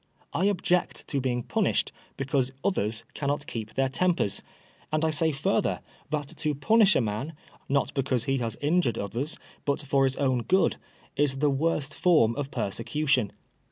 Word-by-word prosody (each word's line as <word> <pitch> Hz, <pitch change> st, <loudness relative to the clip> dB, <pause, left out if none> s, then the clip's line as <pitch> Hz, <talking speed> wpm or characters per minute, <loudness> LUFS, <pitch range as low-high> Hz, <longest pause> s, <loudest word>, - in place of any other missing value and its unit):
I 185 Hz, -, +1 dB
object 180 Hz, -3 st, +1 dB
to 140 Hz, -, 0 dB
being 125 Hz, -2 st, -1 dB
punished -, -, +1 dB, 0.3 s
because 135 Hz, -1 st, 0 dB
others 115 Hz, -, 0 dB
cannot 145 Hz, 0 st, -1 dB
keep 110 Hz, -4 st, -6 dB
their 135 Hz, 0 st, +2 dB
tempers; 165 Hz, -, +1 dB, 0.5 s
and 155 Hz, +1 st, +1 dB
I 160 Hz, -, +2 dB
say 160 Hz, +1 st, +1 dB
further, 135 Hz, -, 0 dB, 0.3 s
that 145 Hz, -2 st, -2 dB
to 150 Hz, -1 st, 0 dB
punish 215 Hz, +7 st, +5 dB
a -, -, +4 dB
man, 110 Hz, +8 st, -3 dB, 0.4 s
not 140 Hz, 0 st, +1 dB
because 130 Hz, -3 st, 0 dB
he 135 Hz, 0 st, 0 dB
has 115 Hz, -2 st, -3 dB
injured 145 Hz, -, +2 dB
others, 120 Hz, +9 st, -3 dB, 0.3 s
but 140 Hz, +1 st, -1 dB
for 135 Hz, -1 st, +3 dB
his 135 Hz, 0 st, 0 dB
own 130 Hz, -3 st, +1 dB
good, 185 Hz, +10 st, +2 dB, 0.4 s
is 140 Hz, -1 st, +1 dB
the 145 Hz, +1 st, +2 dB
worst 150 Hz, 0 st, 0 dB
form 150 Hz, -12 st, +4 dB
of 140 Hz, -1 st, -3 dB
persecution. 125 Hz, +1 st, 0 dB
140 Hz, 160 wpm, -27 LUFS, 125-155 Hz, 0.5 s, punish